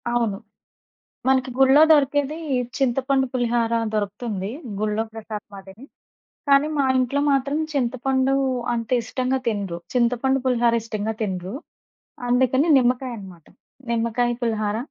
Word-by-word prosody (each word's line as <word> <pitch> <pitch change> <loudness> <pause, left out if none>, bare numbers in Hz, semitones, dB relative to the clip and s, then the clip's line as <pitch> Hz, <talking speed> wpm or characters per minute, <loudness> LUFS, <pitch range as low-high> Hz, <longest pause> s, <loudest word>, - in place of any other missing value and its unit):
అవును. 235 -4 0 0.9
మనకి 260 0 +2
గుళ్ళొ 270 +2 +6
దొరికేది 290 0 +2 0.4
చింతపండు 265 +1 +1
పులిహార 240 -2 0 0.2
దొరుకుతుంది 205 -1 -3 0.3
గుళ్ళో 215 +1 0
ప్రసాదం 215 -2 -8
అదే. 190 0 -13 0.7
కానీ 280 +1 +5
మా 280 - +2
ఇంట్లో 255 +2 +1
మాత్రం 275 +2 +1 0.2
చింతపండు 260 0 0 0.4
అంత 230 -2 -3
ఇష్టంగా 255 +2 -1
తినరు. 200 -6 -2 0.2
చింతపండు 250 +2 +2
పులిహార 240 -2 +2
ఇష్టంగా 220 -1 -3
తినరు. 190 -2 -3 0.7
అందుకని 260 +4 +2
నిమ్మకాయనమాట, 240 - -2 0.5
నిమ్మకాయ 235 +1 0
పులిహార 215 -2 -1
240 Hz, 105 wpm, -23 LUFS, 215-265 Hz, 0.9 s, గుళ్ళొ